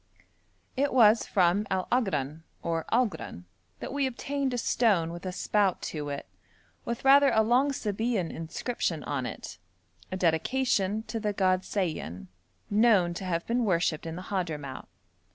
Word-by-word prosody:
It 280 +1 +1
was 225 -2 +6
from 190 +2 +2
Al 185 -1 -1
Agran 160 - 0 0.2
or 165 -1 -1
Algran 215 - -1 0.4
that - - -5
we 280 -1 +1
obtained 275 +2 -2
a 245 - -2
stone 205 -8 +2
with 175 +2 -7
a - - -2
spout 200 0 +1
to 150 -2 -4
it, 140 -1 -5 0.6
with 235 +2 -4
rather 280 +1 +7
a 220 - +3
long 250 +5 +3
Sabæan 220 -6 -1
inscription 165 - -3
on 130 -4 -2
it, - - -8 0.5
a 185 - -2
dedication 200 +4 +1
to 225 0 -4
the 210 -1 -1
god 185 -2 +2
Sayan, 125 - -3 0.4
known 205 -5 +4
to 185 - -6
have 170 -2 -1
been 240 +1 0
worshipped 170 -5 0
in 165 - -5
the 180 - -7
Hadhramout. 155 -9 -4
195 Hz, 155 wpm, -28 LUFS, 165-235 Hz, 0.6 s, rather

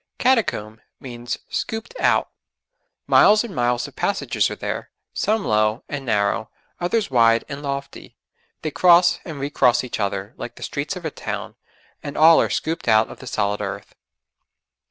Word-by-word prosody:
'Catacomb' 115 - 0 0.2
means 120 -2 -6
'scooped 225 - -4
out.' - - +2 0.7
Miles 210 +2 +5
and 230 -6 -8
miles 120 0 0
of - - -15
passages - - 0
are - - -5
there, - - -5 0.2
some 215 0 0
low 110 +2 +1
and 145 -2 -5
narrow, 105 +1 0 0.3
others 180 0 0
wide 115 -2 +4
and 140 0 -6
lofty; 140 -1 -6 0.5
they 155 - -2
cross 175 +2 +5
and 155 -4 -7
re 140 +1 -3
cross 125 -4 +3
each 125 - -5
other, 100 +1 -3
like 120 - -7
the - - -10
streets 145 +7 -3
of 180 -2 -8
a 160 - -2
town, - - -5 0.5
and 145 - -7
all 160 +1 +7
are - - 0
scooped 160 -4 -3
out 110 -1 +4
of - - -11
the - - -10
solid 100 +1 -1
earth. 100 0 -6
135 Hz, 165 wpm, -22 LUFS, 110-170 Hz, 0.7 s, all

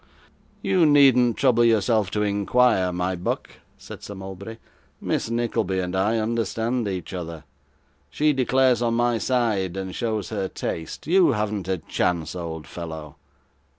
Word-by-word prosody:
'You 185 -4 +3
needn't 130 -5 +5
trouble 125 -3 +3
yourself 110 -2 +2
to 105 +1 -1
inquire, 100 -1 +2
my 90 +1 -1
buck,' 90 - -4 0.2
said - - -11
Sir 100 - -8
Mulberry; 95 +3 -8 0.4
'Miss - - -2
Nickleby 115 -5 -1
and 90 0 -3
I 105 +4 +1
understand 115 +1 -1
each 95 -2 -5
other; 85 -3 -6 0.7
she 150 - +2
declares 130 -1 +2
on 115 -1 +1
my 120 -1 +1
side, 110 -8 0
and 95 -1 -4
shows 110 -6 -2
her 100 -3 -2
taste. 80 -3 -5
You 175 -2 +4
haven't 105 -3 -2
a 95 -1 0
chance, 85 0 -2
old 80 -3 -5
fellow. 80 -3 -8
105 Hz, 145 wpm, -24 LUFS, 90-120 Hz, 0.7 s, needn't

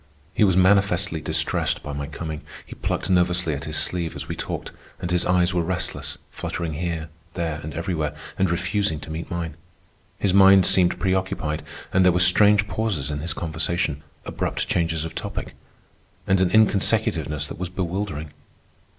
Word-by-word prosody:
He - - +3
was 95 -3 +4
manifestly 95 -3 +3
distressed - - 0
by 75 - -5
my 70 0 -4
coming. 80 0 -5 0.2
He - - -9
plucked - - -2
nervously 90 -2 +2
at 70 0 -5
his 80 0 -1
sleeve 85 -3 0
as - - -6
we - - -4
talked; - - -5 0.3
and 90 - -4
his 90 -1 +2
eyes 90 0 +3
were 90 - +2
restless, 90 +1 -3
fluttering 85 -2 -4
here, 80 0 -3 0.3
there, 80 -4 -2
and 80 - -6
everywhere, 80 -4 -2 0.2
and 95 -1 +3
refusing 85 -1 0
to 80 - -8
meet 80 +2 -5
mine. 85 -2 -3 0.6
His 95 - +1
mind 95 -1 +7
seemed 90 -2 +4
preoccupied, 95 -5 -1 0.3
and 95 - +5
there 90 - +6
were 90 - +1
strange 100 +3 +5
pauses 100 -11 -2
in 75 - -3
his 80 +3 -2
conversation, 80 -2 -2 0.2
abrupt - - -2
changes 80 -2 0
of 80 - -6
topic, - - -5 0.7
and 95 0 +3
an 95 - +3
inconsecutiveness 100 -7 +2
that 75 - -8
was 90 -1 -3
bewildering. 90 -4 -3
85 Hz, 165 wpm, -24 LUFS, 80-95 Hz, 0.7 s, mind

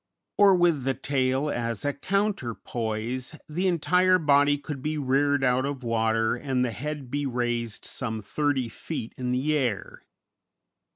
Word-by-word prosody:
Or, 200 -2 +7
with 170 -6 +3
the 135 0 0
tail 135 +1 0
as 115 0 -2
a 145 - +1
counterpoise, 125 - -2
the 175 +5 -1
entire 180 +2 +3
body 145 -2 +4
could 140 -1 -6
be 155 +2 -2
reared 140 0 +2
out 125 0 +3
of 140 -2 -4
water 115 -1 +1
and 125 0 0
the 120 - -2
head 145 0 -5
be 145 0 -1
raised 120 -3 -2
some 110 -4 -3
thirty 135 +4 -1
feet 115 +1 -6
in 125 -1 -3
the 140 +5 +1
air. 125 -8 -2
135 Hz, 150 wpm, -26 LUFS, 120-150 Hz, -, Or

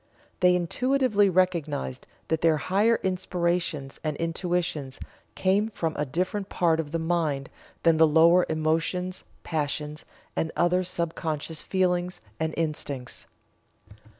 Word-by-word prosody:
They 180 0 +5
intuitively 215 +3 +2
recognized 165 - 0 0.2
that 160 -1 0
their 160 -2 +4
higher 205 +8 +2
inspirations 175 -6 -1
and 155 -2 -2
intuitions 165 -5 -2 0.4
came 200 +3 +2
from 165 -7 -3
a 150 - -1
different 185 +7 -2
part 165 -2 +2
of 155 -2 -2
the 165 - 0
mind 160 -5 -1 0.3
than 165 -1 +5
the 160 0 +6
lower 165 +3 +5
emotions, 165 +4 -1 0.2
passions, 150 -1 -3 0.3
and 160 - -1
other 180 +1 +2
sub 170 -2 -2
conscious 155 0 -3
feelings, 180 -1 0 0.2
and 160 0 -1
instincts. 145 -5 -3
165 Hz, 125 wpm, -26 LUFS, 155-180 Hz, 0.4 s, the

